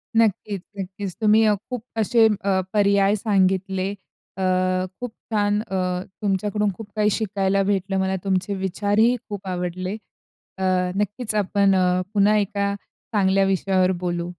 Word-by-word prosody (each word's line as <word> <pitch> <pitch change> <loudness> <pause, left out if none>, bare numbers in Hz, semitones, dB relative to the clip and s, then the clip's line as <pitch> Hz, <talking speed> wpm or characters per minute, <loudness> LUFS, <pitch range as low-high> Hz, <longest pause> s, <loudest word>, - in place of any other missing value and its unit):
नक्कीच, 210 -3 +1 0.2
नक्कीच. 190 0 -5
तुम्ही 215 +1 +5
अ, 210 - +4 0.2
खूप 250 -3 -4 0.2
असे 225 +1 +4 0.2
अ, 195 -1 +2
पर्याय 200 0 +3
सांगितले. 190 -2 +1 0.5
अ, 190 - -2 0.6
खूप 245 -2 -5 0.2
छान 205 -1 +2
अ, 215 -3 -6 0.5
तुमच्याकडून 205 +1 0
खूप 220 -2 -8
काही 210 0 +3
शिकायला 195 -2 0
भेटलं 195 -1 0
मला 190 0 0
तुमचे 190 +1 0
विचारही 205 +5 +1
खूप 200 -2 -6
आवडले. 185 +2 -3 0.6
अ, 190 - -4 0.3
नक्कीच 210 +2 -1
आपण 200 -1 +2
अ, 180 0 +2
पुन्हा 205 +1 +4
एका 200 0 0 0.4
चांगल्या 195 -1 +3
विषयावर 190 -1 +2
बोलू. 175 -1 -2
200 Hz, 135 wpm, -23 LUFS, 190-210 Hz, 0.6 s, तुम्ही